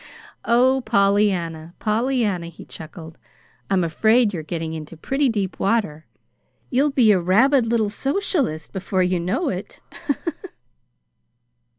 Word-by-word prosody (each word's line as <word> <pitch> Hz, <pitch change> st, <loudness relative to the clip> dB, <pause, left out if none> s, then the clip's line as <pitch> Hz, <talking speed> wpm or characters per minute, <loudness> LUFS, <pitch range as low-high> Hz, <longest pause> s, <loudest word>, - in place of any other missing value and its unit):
"Oh, 255 Hz, +3 st, +3 dB
Pollyanna, 195 Hz, -6 st, +1 dB
Pollyanna," 215 Hz, -5 st, 0 dB
he 170 Hz, -, -12 dB
chuckled; 160 Hz, 0 st, -11 dB, 0.5 s
"I'm 190 Hz, -2 st, +2 dB
afraid 220 Hz, +7 st, +3 dB
you're 170 Hz, -, -3 dB
getting 160 Hz, 0 st, -4 dB
into 160 Hz, +1 st, -8 dB
pretty 270 Hz, -, 0 dB
deep 200 Hz, -5 st, -2 dB
water. 195 Hz, -8 st, -1 dB, 0.6 s
You'll 275 Hz, +3 st, +3 dB
be 250 Hz, -6 st, +4 dB
a 195 Hz, -, +4 dB
rabid 235 Hz, +8 st, +3 dB
little 225 Hz, -3 st, +1 dB
socialist 275 Hz, -, -2 dB
before 190 Hz, -1 st, -1 dB
you 180 Hz, 0 st, 0 dB
know 195 Hz, -, -1 dB
it." 185 Hz, +1 st, -6 dB
200 Hz, 115 wpm, -22 LUFS, 170-240 Hz, 0.6 s, be